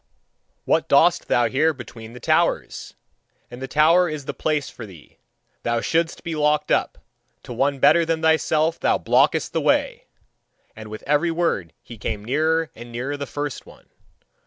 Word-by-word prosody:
What - - +1
dost - - +4
thou 120 -1 +2
here 150 +6 +1
between 115 -2 -11
the 125 - -10
towers? - - 0 0.6
In 120 - -9
the 135 - -5
tower 165 +5 +4
is 150 -3 -6
the - - -4
place 150 -3 -1
for 115 - -10
thee, 85 -7 -16 0.4
thou 120 0 0
shouldst 165 +5 -1
be 165 -1 -4
locked 150 0 +1
up; - - +1 0.5
to 125 - -8
one 140 +4 0
better 150 +5 +5
than 165 -1 -2
thyself 160 0 +2
thou - - +2
blockest - - +2
the - - -1
way!" - - 0 0.7
And 110 -1 -10
with 110 0 -8
every 150 +4 +1
word 165 - -1
he 115 -3 -12
came 105 0 -4
nearer 160 +5 0
and 120 +1 -11
nearer 130 +5 -4
the 140 -1 -6
first 145 -1 -5
one. - - -18
145 Hz, 170 wpm, -22 LUFS, 120-160 Hz, 0.7 s, better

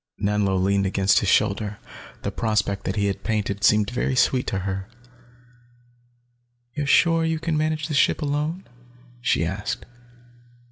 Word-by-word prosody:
Nanlo 100 -1 +1
leaned 100 +1 +1
against 95 +1 +3
his - - -1
shoulder, 105 -1 +1 0.5
the - - -2
prospect 105 -3 -1
that - - -2
he 100 -2 +1
painted 105 -1 -3
seemed 105 -1 +4
very 125 +1 -1
sweet 130 0 +2
to - - -1
her. 95 +1 -4 1.8
"You're 145 +1 -3
sure 165 +3 +4
you 160 0 0
can 160 0 -2
manage 155 0 -1
the 155 - -4
ship 145 - +2
alone?" 150 +5 -2 0.6
she 80 - +1
asked. 95 +5 -4
105 Hz, 140 wpm, -23 LUFS, 100-150 Hz, 1.8 s, seemed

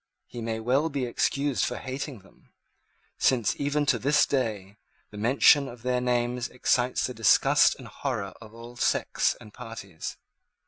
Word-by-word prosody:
He 120 - -8
may 110 0 -3
well 130 +8 +1
be 140 -4 -2
excused 140 +3 0
for - - -1
hating 130 -2 -6
them; 95 - -24 0.7
since, 120 -5 +2
even 145 +1 0
at 130 -5 +1
this 145 +3 +4
day, 105 -7 -2 0.3
the 105 - -10
mention 135 +4 +5
of 120 -2 -11
their 125 0 0
names 125 0 0
excites 125 0 0
the 125 - -4
disgust 115 -2 +4
and - - -11
horror 100 -1 -4
of 110 -2 -12
all 115 +1 -11
sects - - +1
and 105 - -14
parties. 115 -8 -8
125 Hz, 155 wpm, -27 LUFS, 115-135 Hz, 0.7 s, mention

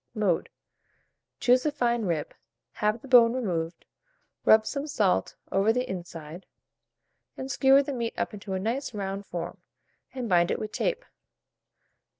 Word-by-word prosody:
Mode. 200 -6 +1 0.9
Choose 250 +1 +4
a 300 - +1
fine 240 -5 0
rib, 165 -5 -2 0.4
have 215 +2 -1
the - - -10
bone 240 -3 +7
removed, 175 -9 -3 0.6
rub 220 0 +6
some 280 +5 -3
salt 205 -10 +1 0.2
over 195 +3 +3
the 250 +2 -1
inside, 170 -2 -7 0.9
and 265 +1 -5
skewer 275 +1 +5
the 280 0 -4
meat 235 -2 -3
up - - -2
into 200 -1 -6
a 190 - -1
nice 235 +4 -2
round 195 0 -4
form, 175 -1 -6 0.5
and 255 -3 -4
bind 175 -3 +3
it - - 0
with 215 - -5
tape. - - -1
220 Hz, 150 wpm, -27 LUFS, 190-255 Hz, 0.9 s, bone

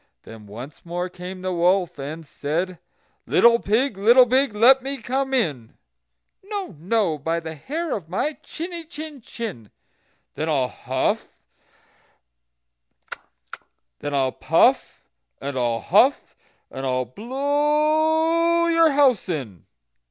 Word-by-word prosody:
Then 110 -2 -12
once 120 +8 -10
more 175 +1 -4
came 180 +1 -9
the 185 0 -2
wolf, 175 -1 +1
and 155 +4 -6
said: 165 +5 -3 0.5
"Little 235 0 +5
pig, 220 +1 0
little 240 +5 +7
pig, 255 -2 +1
let 255 +5 +6
me 275 +2 -4
come 265 +1 -2
in." 145 - -1 0.7
"No, 395 - -5
no, 180 -3 0
by 165 +4 -1
the 160 -1 -7
hair 300 - -4
of 165 -6 -8
my 295 - -1
chiny 340 +1 -7
chin 305 -3 -9
chin." 205 - -7 0.6
"Then 155 +1 -3
I'll 135 -5 +1
puff, - - -2 2.6
and 145 -1 -3
I'll 120 - 0
huff, - - +2 0.4
and 135 - -6
I'll 130 -1 0
blow 305 - +1
your 330 -1 +4
house 270 -9 +3
in." 125 - -5
195 Hz, 115 wpm, -23 LUFS, -, 2.6 s, little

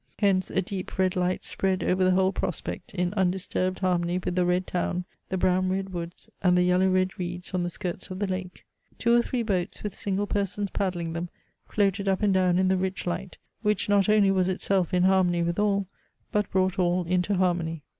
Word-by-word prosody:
Hence 195 -3 +2
a 190 - 0
deep 185 0 -6
red 185 -1 +2
light 180 0 0
spread 190 -1 -1
over 185 +1 +2
the 185 - +4
whole 190 +1 +3
prospect, 180 -3 -4
in 180 0 0
undisturbed 185 -1 0
harmony 175 -1 +1
with 180 - -2
the 180 0 +1
red 180 +1 +1
town, 180 0 -2 0.2
the 190 - -1
brown 185 0 +2
red 190 +1 -1
woods, 170 0 -6
and 180 -2 +4
the 180 - +4
yellow 180 +1 +3
red 185 0 +1
reeds 180 0 -5
on 180 - +1
the 175 - -1
skirts 175 +1 -5
of 185 - -5
the 205 - 0
lake. 185 -1 -5 0.3
Two 235 -1 +2
or 240 - +5
three 240 0 -2
boats, 190 -4 -2
with 210 -3 -3
single 200 0 -1
persons 200 0 -2
paddling 175 -4 -2
them, 170 +1 -4 0.4
floated 200 -1 0
up 195 +2 +1
and 200 -2 +3
down 185 -2 +3
in 185 0 +3
the 190 0 +3
rich 190 0 -2
light, 180 +1 -4 0.2
which 210 -2 0
not 200 0 +3
only 210 -2 +5
was 185 -1 +2
itself 185 -1 0
in 180 0 +2
harmony 185 -2 +3
with 170 +3 -1
all, 200 -1 +2 0.5
but 210 -1 0
brought 190 0 +1
all 180 0 +2
into 180 +3 0
harmony. 170 -4 0
185 Hz, 210 wpm, -26 LUFS, 180-195 Hz, 0.5 s, or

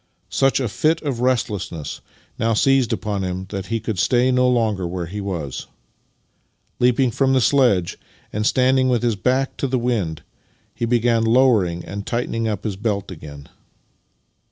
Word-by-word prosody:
Such 135 0 +2
a 130 - -1
fit 155 +11 +1
of 135 -6 -2
restlessness 105 - -2 0.4
now 115 0 +1
seized 135 0 +3
upon 100 -3 -2
him 90 0 -3
that 95 -1 -5
he 115 +2 -1
could 110 -4 -4
stay 125 +4 +3
no 125 0 +3
longer 110 -7 +1
where 90 0 -4
he 100 +5 -6
was. 85 -9 -5 1.1
Leaping 125 +1 +3
from 135 +3 +1
the 130 - +4
sledge, 120 -9 +2 0.3
and 105 - -1
standing 130 0 +3
with 120 -1 +1
his 120 -3 +1
back 130 +7 0
to 140 - -1
the 130 0 0
wind, 100 -11 -1 0.5
he 120 - -2
began 115 -1 +2
lowering 115 -8 +3
and 100 +1 -6
tightening 115 -1 -1
up 105 -2 -3
his 105 -4 -3
belt 100 -2 -2
again. 75 -4 -10
115 Hz, 160 wpm, -21 LUFS, 95-125 Hz, 1.1 s, the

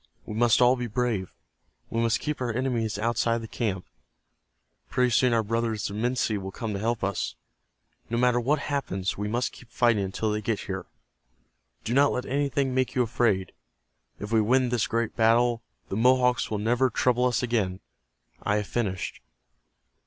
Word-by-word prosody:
We - - -6
must 120 +2 +4
all 125 +1 +5
be 125 -1 -3
brave. 110 -5 -1 0.6
We 115 - 0
must 115 -1 +2
keep 150 -3 -3
our 120 -2 0
enemies 115 -3 -1
outside 115 +1 +1
of 115 - -3
the - - -6
camp. 105 -5 -2 1.0
Pretty 125 -1 +2
soon 125 +2 +4
our 115 -1 +2
brothers, 115 0 -1
the - - -6
Minsi, 110 -1 0
will 95 0 -6
come 110 +2 -4
to 100 - -3
help 115 +1 -1
us. 100 -1 -2 0.7
No 115 - -1
matter 125 0 +3
what 140 +6 +2
happens 100 -11 -2
we 105 +1 -3
must 120 +4 -1
keep 125 - -15
fighting 120 -4 +2
until 105 +3 -2
they 105 0 -1
get 105 0 -1
here. - - -5 1.0
Do 115 - -2
not 140 +2 +5
let 125 - -2
anything 140 -1 0
make 130 +1 0
you 125 - +3
afraid. 110 -5 +1 0.7
If 105 +1 -6
we 110 -1 +4
win 125 +3 +3
this 120 -3 +1
great 115 -1 -1
battle, 115 +1 +3 0.3
the 95 - -2
Mohawks 125 +1 +3
will 110 - -1
never 120 +5 +2
trouble 125 +2 +2
us 125 -1 +1
again. 105 -6 0 0.6
I 105 - 0
have 105 0 0
finished." 95 -4 -3
115 Hz, 180 wpm, -26 LUFS, 105-125 Hz, 1.0 s, all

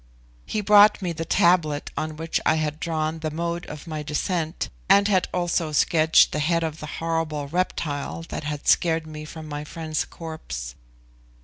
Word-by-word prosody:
He 215 - -1
brought 210 0 +6
me 175 -2 -1
the 165 0 -4
tablet 160 -4 +2
on 155 0 -3
which 165 +1 -2
I 155 - +3
had 155 -1 -2
drawn 160 -1 -2
the 155 0 -2
mode 170 +2 -3
of 150 +2 -8
my 155 -2 -4
descent, 160 +3 -2 0.2
and 200 +1 +6
had 190 -3 +2
also 175 -3 0
sketched 160 +1 +4
the 150 - -2
head 165 +2 +1
of 160 -1 -3
the 150 - -7
horrible 165 -3 -2
reptile 160 -2 -2
that - - -5
had 150 -1 -5
scared 165 -2 +3
me 155 -1 -8
from 155 0 -9
my 145 0 -5
friend's 155 0 -3
corpse. 155 - -7
160 Hz, 175 wpm, -24 LUFS, 155-170 Hz, 0.2 s, brought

